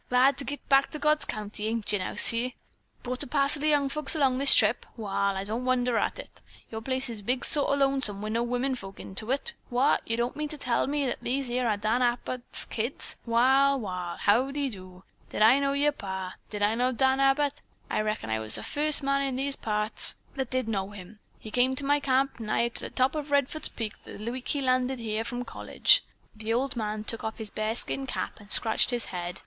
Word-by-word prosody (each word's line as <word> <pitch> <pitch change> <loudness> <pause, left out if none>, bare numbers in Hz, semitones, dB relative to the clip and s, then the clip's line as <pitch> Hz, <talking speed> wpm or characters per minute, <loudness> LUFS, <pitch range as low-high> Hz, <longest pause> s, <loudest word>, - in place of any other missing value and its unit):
Glad 255 +2 +4
to - - +1
git 285 +1 -6
back 275 0 +4
to - - -4
God's 300 +1 +2
country, 210 0 -5
ain't 220 -2 -2
you 205 - +1
now, 185 - -4
Si? 240 +2 0 0.5
Brought 250 0 -4
a - - -2
parcel 280 +2 +1
of 305 - +2
young 290 -2 +3
folks 300 +2 -1
along 265 -4 +2
this 280 0 +8
trip? 220 +1 +4
Wall, 200 -2 -1
I 190 - -3
don't 220 +5 -3
wonder 250 -1 +1
at - - -1
it. - - -11 0.3
Your 220 0 -5
big - - -17
place 260 0 -1
is 215 -3 -5 0.2
sort 290 -2 +3
o' 280 - +3
lonesome 270 -7 +2
wi' 215 +1 -4
no 230 +2 0
wimmin 245 +3 -1
folks 195 -5 -10
into 215 +4 -5
it. 280 - +1 0.2
What? 250 +4 +2
You 230 - -1
don' 240 +1 0
mean 300 0 -4
to 300 - -6
tell 250 -3 0
me 280 -3 0
these 265 +1 -2
here 245 0 0
are 210 -2 +1
Dan 220 +4 0
Abbott's 245 0 +1
kids! 235 +4 -4
Wall, 265 +4 +4
wall. 180 -5 -4
How 245 +6 +3
de 280 -1 -2
do? 185 -2 -10 0.3
Did - - +1
I 240 +5 +7
know 275 0 +1
yer 290 +1 +3
pa? 190 -7 -6
Did 205 -1 -3
I 210 +2 +3
know 250 +2 +1
Danny 265 +2 +2
Abbott? 280 +1 +2 0.3
I - - 0
reckon 215 - -3
I 110 - 0
was 110 0 0
the - - -2
furst 300 0 +2
man 275 0 +1
in 270 -2 -1
these 275 +2 0
here - - -7
parts 210 0 +1 0.2
that 265 -3 -3
did 255 -2 -1
know 195 -3 -2
him. 205 +1 -12 0.2
He 215 - -10
come 255 +2 +2
to 275 - -3
my 290 +1 +3
camp, 270 -1 +1
nigh 230 +1 0
to - - -4
the - - -6
top 255 0 +1
of 300 -1 -4
Redfords' 285 +2 +1
Peak, 220 -3 -4
the 220 +3 -6
week 255 0 -6
he 285 - -1
landed 255 0 +1
here 220 -1 -2
from 245 +2 -5
college." - - +3 0.3
The 220 +1 -4
old 255 +3 0
man 215 -2 -3
took 230 +1 -4
off 220 0 -4
his 220 -3 -6
bearskin 225 +5 -3
cap - - -4
and 205 0 -15
scratched 220 -2 +4
his 245 -2 +1
head. 175 0 -3
245 Hz, 230 wpm, -27 LUFS, 215-275 Hz, 0.5 s, this